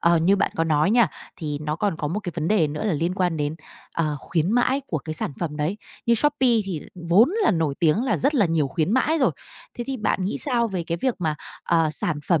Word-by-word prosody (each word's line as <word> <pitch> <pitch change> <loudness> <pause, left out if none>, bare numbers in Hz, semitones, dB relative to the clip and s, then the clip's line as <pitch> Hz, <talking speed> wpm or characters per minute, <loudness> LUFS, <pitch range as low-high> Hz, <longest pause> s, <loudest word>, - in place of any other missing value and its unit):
ờ, 170 0 +4
như 185 +5 +3
bạn - - +1
có 165 - +2
nói 155 +3 +2
nha, 235 0 +5 0.3
thì 150 -3 -4
nó 150 0 -2
còn 200 -3 0
có 150 - -2
một 205 +6 -2
cái 175 -4 -5
vấn 160 -1 -2
đề 205 -7 +3
nữa 150 +4 -4
là 210 - +1
liên 165 +4 -1
quan 180 -4 0
đến, 145 0 -1 0.4
ờ, 155 -3 0
khuyến 170 +1 0
mãi 250 +3 +2
của 160 - -2
cái 155 +2 -6
sản 150 - -1
phẩm 155 -4 -3
đấy, 155 +6 -1 0.3
như 235 - +5
Shopee 290 +1 +2 0.2
thì 180 -6 -4 0.3
vốn 210 +9 +6
là 385 - +4
nổi 160 -6 0
tiếng 165 +7 +3
là 265 - +1
rất 285 +3 +1
là 210 -8 +4
nhiều 160 -4 +1
khuyến 160 +7 0
mãi 300 +6 +2
rồi. 265 - +3 0.5
Thế 240 - -2
thì 270 -1 -3
bạn 205 -4 0
nghĩ 195 - -2
sao 240 -5 +1
về 185 -5 -3
cái 170 0 -2
việc 260 -3 +1
mà, 160 -4 0 0.3
ờ, 165 -2 +2
sản 155 0 -2
phẩm 170 -4 +3
170 Hz, 255 wpm, -24 LUFS, 155-220 Hz, 0.5 s, vốn